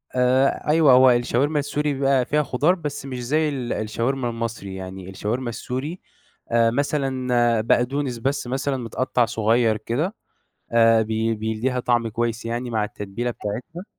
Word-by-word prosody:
آآ، 130 +3 +2
أيوه 150 -3 +5
هو 130 0 +7
الشاورما 125 +5 +1
السوري 145 +1 -1
بيبقى 135 -2 +2
فيها 150 +3 +1
خُضار 150 +8 +2
بس 145 -5 -5
مش 125 -2 -5
زي 155 +4 +1
ال 130 -4 -3
الشاورما 120 +4 -1
المصري، 115 -4 -5
يعني 95 0 -8
الشاورما 115 +6 -3
السوري 130 +9 -5 0.5
آآ، 115 -1 +4
مثلًا 130 -4 +1
بقدونس 125 +3 0
بس 135 +1 -1
مثلًا 135 +2 -1
متقطّع 125 +1 0
صغيّر 115 0 +2
كده، 145 - -2 0.6
آآ، 115 -1 +5
بي 110 +1 0
بيدّيها 110 +4 -2
طعم 120 -1 +1
كويس 115 +1 -2
يعني 120 +2 -3
مع 110 -2 0
التتبيلة 105 +3 -4
بتاعتها. 125 - -6
120 Hz, 145 wpm, -23 LUFS, 115-135 Hz, 0.6 s, هو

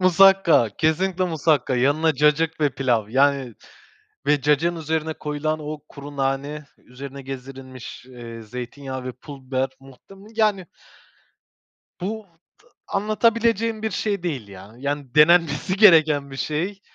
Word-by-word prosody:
Musakka, 185 - +5
kesinlikle 180 +4 +1
musakka, 150 -6 +1
yanına 145 +5 +2
cacık 150 +3 +2
ve 145 -2 +3
pilav 120 -6 0
yani 135 0 +2 0.7
ve 145 0 +3
cacığın 150 +5 +2
üzerine 160 0 -2
koyulan 155 +1 -3
o 150 0 -6
kuru 145 0 -10
nane, 140 +2 -2
üzerine 135 +2 -10
gezdirilmiş, 130 -1 -9
eee, 120 -3 -10
zeytinyağı 125 +3 -7
ve 130 - -4
pul 135 +2 -12
biber, 130 0 0
muhtem 135 +8 -16 0.2
yani 210 -5 +1 1.4
bu 215 +4 -3 0.5
t - - -29 0.2
anlatabileceğim 225 +1 +1
bir 220 - -1
şey 200 -1 -2
değil 140 - -3
ya, 100 +2 -12
yani 140 -1 -4
denenmesi 170 +4 +4
gereken 155 -8 +5
bir - - -7
şey. 175 +9 -2
150 Hz, 130 wpm, -23 LUFS, 135-175 Hz, 1.4 s, Musakka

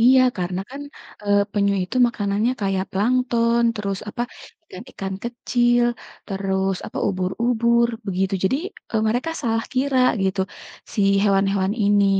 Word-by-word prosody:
Iya 255 +3 +6 0.2
karena 180 +1 -2
kan, 280 +1 -7 0.4
eee, 205 0 +4
penyu 200 -1 +2
itu 180 +8 -4
makanannya 210 +1 0
kayak 195 -1 0
plankton, 235 +2 +2
terus 200 -2 -3
apa, 235 - -3 0.5
ikan-ikan 195 -2 -6
kecil, 240 0 +2 0.4
terus 195 -1 -1
apa, - - -6
ubur-ubur, 235 +5 +1 0.2
begitu 195 0 0
jadi, 260 +8 +2 0.3
eee, 220 -1 +1
mereka 245 +8 0
salah 225 -3 0
kira 260 0 +1 0.2
gitu, 190 0 0 0.5
si - - 0 0.2
hewan-hewan 195 -1 +2
ini, 205 -2 +3
205 Hz, 130 wpm, -22 LUFS, 195-235 Hz, 0.5 s, Iya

